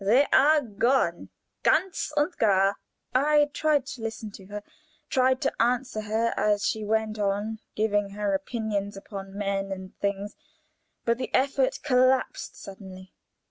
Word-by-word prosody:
They 240 +8 +5
are 300 +3 +6
gone 225 -5 0 0.3
ganz 380 -4 +1
und 295 +4 +1
gar." 195 -2 +3 0.4
I 295 +2 +3
tried 305 -3 +2
to 240 - -8
listen 220 -1 -5
to 195 -1 -12
her, 205 0 -6 0.5
tried 260 0 +3
to - - 0
answer 245 -1 +1
her 220 +2 0
as 210 -1 +1
she 220 - -1
went 220 0 0
on 205 +2 -1 0.2
giving 205 -2 +1
her 200 0 -2
opinions 205 0 -2
upon 195 -1 -8
men 195 -1 -2
and 190 -1 -7
things, 200 +1 -2 0.7
but 235 +1 +1
the 255 - -3
effort 270 0 +1
collapsed 255 -2 +2
suddenly. 190 -1 -11
215 Hz, 140 wpm, -27 LUFS, 200-255 Hz, 0.7 s, are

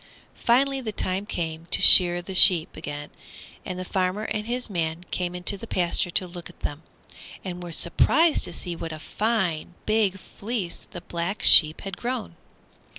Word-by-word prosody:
Finally 270 +3 +1
the 225 -4 -5
time 195 0 -3
came 165 -3 -5
to - - +2
shear 175 -1 +7
the 190 - -8
sheep 180 -3 +5
again, 145 -1 -8 0.5
and 185 - -6
the 185 - -6
farmer 185 +3 -2
and 210 0 -4
his 245 +1 -3
man 170 -4 -3
came 180 -1 -3
into 180 +3 +2
the - - -10
pasture 175 0 0
to 185 - +1
look 175 -1 -10
at - - -19
them, 145 +2 -5 0.6
and 180 -1 -6
were 175 -1 -8
surprised 300 - +2
to - - -8
see 175 -2 -6
what 165 0 -7
a 155 - -7
fine, 185 -3 -2
big 215 -3 0
fleece 200 -1 -7
the 175 - -10
Black 175 +3 -4
Sheep 155 -1 +6
had 195 -2 -7
grown. 240 -7 -5
180 Hz, 175 wpm, -24 LUFS, 170-210 Hz, 0.6 s, shear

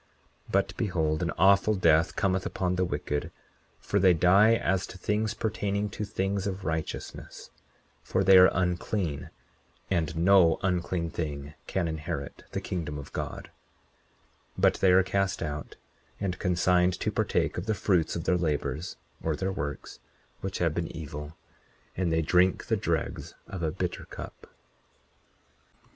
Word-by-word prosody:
40:26 - - -12
But 95 -1 +1
behold, 80 -7 0
an 85 - 0
awful 100 +2 +5
death 85 -3 +3
cometh 95 -2 +1
upon 90 -1 -1
the 90 - +1
wicked; 75 -4 -3 0.5
for 100 - 0
they 95 -2 +5
die 100 +7 +5
as 95 -4 0
to - - -10
things 105 +4 -1
pertaining 105 -2 -2
to 105 - -4
things 100 0 -2
of 95 -1 -4
righteousness; 80 0 -5 0.5
for 95 - 0
they 95 0 +7
are 90 - +8
unclean, 90 -3 -1 0.6
and 80 -4 0
no 85 -1 +5
unclean 90 -2 -1
thing 75 -3 -4
can 90 -3 -1
inherit 80 -2 -5
the - - -2
kingdom 80 -5 -4
of 70 - -9
God; - - -5 1.1
but - - +4
they 95 - +5
are 95 +1 +6
cast 95 -1 -1
out, 75 -2 -5 0.4
and 90 -3 -2
consigned 90 0 +2
to - - -1
partake - - 0
of 90 - -7
the 110 - +1
fruits 90 -5 +1
of 85 - -3
their 90 - +2
labors 75 -1 -2 0.3
or 80 -2 -1
their 95 +4 -2
works, 70 -7 -5 0.4
which 95 0 -4
have 85 -3 +1
been 85 0 -2
evil; 75 0 -7 0.6
and 90 -2 0
they 80 0 +2
drink 90 +4 +3
the - - +1
dregs - - -2
of 95 - -7
a 80 - +1
bitter 90 +2 -4
cup. - - -10
90 Hz, 155 wpm, -28 LUFS, 80-95 Hz, 1.1 s, are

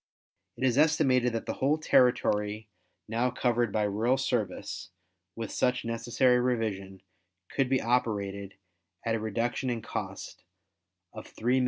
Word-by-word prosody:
It - - -5
is 130 0 +3
estimated 130 -5 +3
that 115 - -3
the - - -2
whole 145 +4 +3
territory 110 -7 +2 0.4
now 115 +3 +1
covered 120 -2 0
by 105 - +1
rural 110 +6 +1
service, 120 -7 -2 0.5
with 115 -2 -5
such 125 -1 0
necessary 120 +2 +2
revision, 105 -6 -2 0.5
could 135 -2 +1
be 130 -1 +3
operated 100 -5 -1 0.5
at 115 - +1
a 115 - 0
reduction 115 +4 -1
in 115 -3 -2
cost - - -6 0.7
of - - -10
$3,500,000. 125 +4 +1
120 Hz, 135 wpm, -29 LUFS, 110-125 Hz, 0.7 s, is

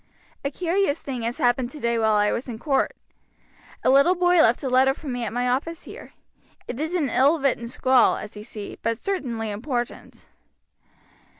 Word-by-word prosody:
A 280 - 0
curious 340 0 0
thing 255 -4 -4
has 230 +1 -2
happened 245 0 +1
today 235 -5 -1
while 220 -1 +3
I 210 0 +3
was 250 +2 -3
in 230 - -5
court. 275 +2 0 0.9
A - - +3
little 280 +7 +5
boy 355 -1 +4
left 235 +1 +3
a - - -1
letter 260 +1 +3
for 305 - -11
me 245 -2 -3
at 210 - -4
my 245 +2 -1
office 285 +7 -2
here; - - -11 0.5
it 245 - -5
is 315 +4 -2
an 315 -6 +1
ill 280 +6 +3
written 255 -4 0
scrawl, 255 +1 +3
as 210 - -8
you 210 - -8
see, 210 -1 -8
but 230 0 -1
certainly 235 - -3
important." 240 +3 -5
255 Hz, 185 wpm, -24 LUFS, 235-290 Hz, 0.9 s, little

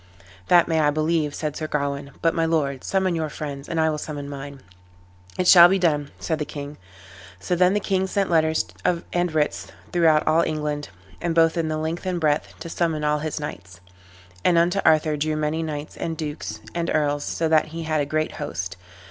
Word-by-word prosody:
"That 175 -2 +5
may 160 -1 +1
I 150 -1 +4
believe," 155 0 0
said 150 -2 -3
Sir 155 - -4
Gawain; 140 -1 -2
"but, 165 - +3
my 165 - 0
lord, 145 -5 0
summon 190 -2 +1
your 160 -2 -2
friends, 145 -2 -6
and 165 - -1
I 160 0 +3
will 150 - -3
summon 145 -2 -6
mine." 140 -1 -8 0.8
"It 180 - 0
shall 175 -1 +10
be 195 - +3
done," 150 -6 +1
said 160 -2 -2
the - - 0
king. 145 0 -7 0.6
So 140 - -1
then 180 +2 +3
the - - +2
king 190 -1 0
sent 195 -1 -1
letters 160 -1 +2 0.5
and 175 -1 +1
writs 155 -1 -1 0.2
throughout 160 -3 +3
all 160 +2 +4
England, 150 -2 -2 0.3
both 165 -1 +3
in 165 -2 0
the 155 0 -1
length 160 +4 -3
and 180 -1 -1
breadth, 150 -2 0
to - - -6
summon 165 -2 -1
all 150 0 +1
his 155 0 -3
knights. 90 - -8 0.6
And 175 - +4
unto 175 +3 +3
Arthur 155 -1 +3
drew 155 +1 -1
many 155 +1 -1
knights, 155 -2 -5 0.2
dukes, 150 -1 -5
and 170 0 -2
earls, 145 -1 +1
so 165 - -1
that 155 -1 +4
he 165 +1 -6
had 155 -1 0
a - - 0
great 155 +1 -1
host. 90 +2 -4
155 Hz, 200 wpm, -23 LUFS, 150-170 Hz, 0.8 s, shall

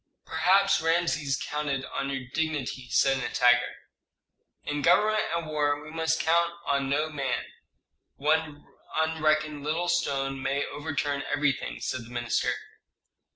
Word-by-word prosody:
"Perhaps 195 +4 +3
Rameses 165 -4 +1
counted 145 -3 -2
on 135 - -3
your 135 -2 -3
dignity," 145 -5 -2
said 135 -1 +3
Nitager. 125 -1 +3 0.9
"In 145 0 -2
government 215 +7 +4
and 170 -1 -2
war 145 -2 0
we 150 +1 -10
must 160 0 0
count 170 +1 +2
on 140 -1 0
no 150 +3 0
man: 135 -5 -2 0.7
one 150 0 0 0.3
unreckoned 155 -2 +1
little 165 +4 -1
stone 135 -5 0
may 140 +2 0
overturn 145 -1 -2
everything," 135 - 0
said 120 -2 -3
the - - -13
minister. 120 -1 0
145 Hz, 125 wpm, -27 LUFS, 135-160 Hz, 0.9 s, government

